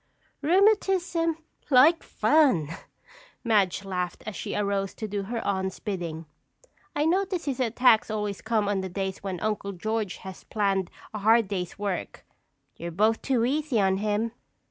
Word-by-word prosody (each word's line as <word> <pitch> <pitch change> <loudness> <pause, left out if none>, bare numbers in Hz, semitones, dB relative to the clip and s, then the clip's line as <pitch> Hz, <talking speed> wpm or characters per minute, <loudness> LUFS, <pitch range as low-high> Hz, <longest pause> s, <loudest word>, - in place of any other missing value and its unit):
"Rheumatism, 360 -2 +2 0.3
like 295 +5 +6
fun!" 260 - +3 0.7
Madge 205 -5 +2
laughed 180 -2 -3
as 215 - -5
she - - -4
arose 200 -1 -1
to 220 - -5
do 205 -1 -2
her 225 +4 -4
aunt's 190 -1 -1
bidding. 170 -6 -4 0.7
"I 295 - +1
notice 370 +1 0
his 275 -2 -2
attacks 240 -2 +4
always 210 -2 -3
come 220 -2 0
on 200 -2 0
the 190 - -4
days 190 +1 -3
when 190 -3 -4
Uncle 210 -2 -2
George 215 +1 -2
has 190 -1 -8
planned 195 -4 0 0.2
a 215 - -4
hard 225 +1 +4
day's 185 -3 -4
work. 200 -3 -4 0.5
You're 170 - -5
both 215 +6 +2
too 250 -4 +1
easy 285 -2 0
on 190 -1 +3
him." 210 +2 0
210 Hz, 150 wpm, -27 LUFS, 195-255 Hz, 0.7 s, like